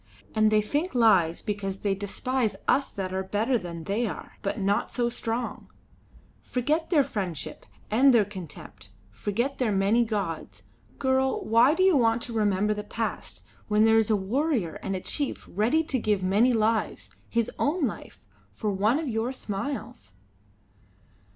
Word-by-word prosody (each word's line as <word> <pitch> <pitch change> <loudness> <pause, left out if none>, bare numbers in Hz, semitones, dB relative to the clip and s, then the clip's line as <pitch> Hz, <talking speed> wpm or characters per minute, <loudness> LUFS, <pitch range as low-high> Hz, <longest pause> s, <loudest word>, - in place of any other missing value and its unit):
And 215 -1 +4
they 215 -1 +3
think 290 - -2
lies 190 -9 +4
because 200 -2 -3
they 200 -2 +1
despise 220 +4 -2
us 275 - +3
that 185 -2 -5
are 190 - -1
better 210 +7 0
than 170 -6 -4
they 210 +7 -1
are, 170 - -8
but 200 - -2
not 200 +1 +1
so 240 -1 0
strong. 235 +1 -4 0.7
Forget 300 +6 -1
their 305 -6 +4
friendship 180 - -5 0.2
and 265 +5 +6
their 230 -4 +4
contempt; 150 - -10 0.2
forget 225 - -2
their 245 -4 +1
many 200 +4 +3
gods. 200 -8 -4 0.3
Girl, 265 0 +1
why 235 +7 +5
do 370 - +2
you 380 -3 +5
want 230 -2 +3
to 235 - -5
remember 210 -1 +2
the 210 0 -5
past 225 +1 -5 0.2
when 210 0 +3
there 225 0 +5
is 220 - +1
a 215 - +4
warrior 215 - -1
and 195 - -3
a 185 - -4
chief 285 +6 -2
ready 230 - +1
to 275 -5 -1
give 210 -4 0
many 205 +7 +4
lives 225 -1 0 0.2
his 235 -1 0
own 305 +2 +1
life 215 - -6 0.3
for 205 - -2
one 210 +7 +2
of 315 -1 -3
your 225 +1 -1
smiles?" 225 - -5
220 Hz, 165 wpm, -27 LUFS, 195-250 Hz, 0.7 s, and